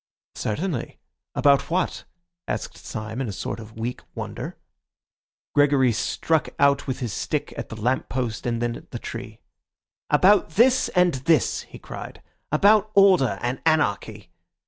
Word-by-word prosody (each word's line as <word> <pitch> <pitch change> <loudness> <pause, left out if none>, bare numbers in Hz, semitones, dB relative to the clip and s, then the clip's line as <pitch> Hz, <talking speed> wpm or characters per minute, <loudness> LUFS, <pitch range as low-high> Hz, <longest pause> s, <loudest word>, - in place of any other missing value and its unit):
"Certainly. 140 - -3 0.4
About 140 -1 +3
what?" 180 +2 -1 0.4
asked - - -4
Syme 110 +3 -6
in 130 - -2
a - - -3
sort 95 - -5
of 110 0 -11
weak 120 +2 -4
wonder. - - -6 1.0
Gregory 140 -3 +4
struck 160 +7 0
out 140 0 +3
with 130 +1 -3
his 120 -4 -3
stick - - -2
at - - -6
the 110 - -8
lamp 125 +4 0
post, 125 -3 -3
and 120 0 -1
then 120 0 -1
at - - -12
the 120 - -5
tree. 115 -1 -8 0.7
"About 185 +7 +5
this 250 +4 +4
and 180 -1 +4 0.2
this," 160 -6 +3
he - - -10
cried; - - -9 0.3
"about 205 +7 +4
order 190 -10 +5
and 125 +2 -2
anarchy. 155 -10 0
135 Hz, 145 wpm, -24 LUFS, 115-165 Hz, 1.0 s, About